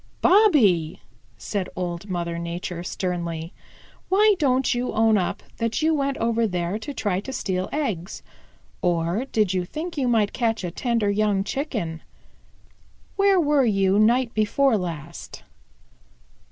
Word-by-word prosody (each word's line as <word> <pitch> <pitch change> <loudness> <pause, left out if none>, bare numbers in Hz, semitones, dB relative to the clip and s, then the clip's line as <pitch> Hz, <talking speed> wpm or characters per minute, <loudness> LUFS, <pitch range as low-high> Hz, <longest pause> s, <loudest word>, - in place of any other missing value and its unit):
"Bobby," 270 - +4 0.4
said 185 - -3
Old 175 +2 -4
Mother 170 -2 -3
Nature 170 +1 -5
sternly, 170 -2 -4 0.6
"why 420 +3 +5
don't 265 -3 +2
you 245 +1 -2
own 220 0 +3
up 185 -4 -1
that 230 +6 -1
you 320 +1 +3
went 275 -2 -1
over 230 0 +1
there 180 +1 -2
to 285 - -6
try 205 -9 -1
to 240 +7 -7
steal 190 -7 -2
eggs? 210 - -3 0.6
Or 175 +6 0
did 210 -4 +1
you 185 -1 0
think 315 - -5
you 260 - +1
might 220 -4 +2
catch 225 -4 -1
a 175 - -3
tender 230 0 0
young 205 -1 +1
Chicken? 210 - -3 1.1
Where 395 -1 +4
were 295 -4 +3
you 195 -2 +2
night 235 +2 +3
before 225 +4 +2
last?" 170 -4 -6
210 Hz, 140 wpm, -24 LUFS, 180-260 Hz, 1.1 s, why